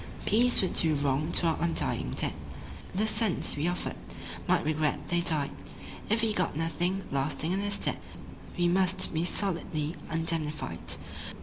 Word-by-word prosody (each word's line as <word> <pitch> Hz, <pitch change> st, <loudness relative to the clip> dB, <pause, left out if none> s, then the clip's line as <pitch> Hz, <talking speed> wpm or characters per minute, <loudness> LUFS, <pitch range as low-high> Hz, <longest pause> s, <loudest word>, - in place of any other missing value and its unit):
Peace 240 Hz, 0 st, +4 dB
would 185 Hz, -, -1 dB
do 160 Hz, -2 st, +3 dB
wrong 145 Hz, +3 st, 0 dB
to 175 Hz, -, +3 dB
our 165 Hz, -1 st, +1 dB
undying 170 Hz, 0 st, -1 dB
dead, -, -, 0 dB, 0.6 s
The 210 Hz, +3 st, +2 dB
sons 215 Hz, -3 st, +2 dB
we 145 Hz, +3 st, -1 dB
offered 175 Hz, 0 st, -3 dB, 0.5 s
might -, -, +2 dB
regret 155 Hz, -1 st, 0 dB
they 175 Hz, -, +2 dB
died 155 Hz, -5 st, 0 dB, 0.6 s
If 225 Hz, +2 st, +2 dB
we 220 Hz, -1 st, +2 dB
got 180 Hz, -, -1 dB
nothing 175 Hz, +4 st, -1 dB
lasting 140 Hz, +4 st, 0 dB
in 190 Hz, -, 0 dB
their 205 Hz, 0 st, -1 dB
stead. 205 Hz, -, +1 dB, 0.6 s
We 175 Hz, 0 st, +2 dB
must 185 Hz, +1 st, +3 dB
be 160 Hz, +1 st, 0 dB
solidly 170 Hz, -4 st, +1 dB, 0.2 s
indemnified. 160 Hz, -2 st, 0 dB
170 Hz, 150 wpm, -29 LUFS, 155-190 Hz, 0.6 s, Peace